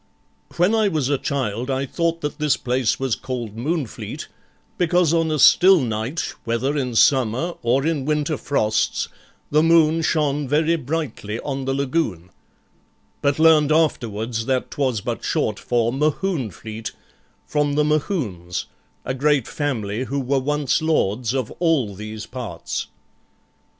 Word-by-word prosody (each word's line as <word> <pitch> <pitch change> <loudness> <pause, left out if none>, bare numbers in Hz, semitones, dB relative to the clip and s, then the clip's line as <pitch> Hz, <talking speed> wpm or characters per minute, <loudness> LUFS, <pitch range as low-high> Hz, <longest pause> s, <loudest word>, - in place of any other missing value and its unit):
When 180 +5 +3
I 220 -2 +3
was 155 -8 0
a 140 -2 +1
child 125 -3 -2
I 135 0 0
thought 165 +3 -1
that 150 +1 -4
this 150 -2 +2
place 125 -2 0
was 135 -3 0
called 120 -5 -4
Moonfleet, 140 +1 -4 0.5
because 175 -2 +3
on 165 -1 +2
a 155 - 0
still 185 +6 +7
night, 120 +4 -2
whether 120 +5 -1
in 125 -5 -2
summer, 130 +7 +3
or 130 +4 +1
in 155 -5 0
winter 150 +1 0
frosts, 110 -7 0 0.4
the 150 +1 +4
moon 165 0 +4
shone 150 -3 0
very 155 +4 +2
brightly 140 -8 -3
on 135 -2 -4
the 135 - 0
lagoon; 130 - -1 0.9
but 140 -1 +1
learned 155 -2 +5
afterwards 115 -7 0
that 130 -1 0
'twas 130 -7 0
but - - -4
short - - 0
for 120 -1 0
'Mohune 150 - 0
fleet', 110 +3 -7 0.5
from 150 -1 0
the 150 +1 +2
Mohunes, 135 - -1 0.4
a - - -1
great 140 -1 +2
family 120 -5 -2
who 140 +2 -2
were 135 +1 +1
once 150 +2 0
lords 125 -6 0
of 130 -4 -2
all 155 - +2
these 110 +2 -7
parts. 125 -2 -5
140 Hz, 145 wpm, -22 LUFS, 120-155 Hz, 0.9 s, still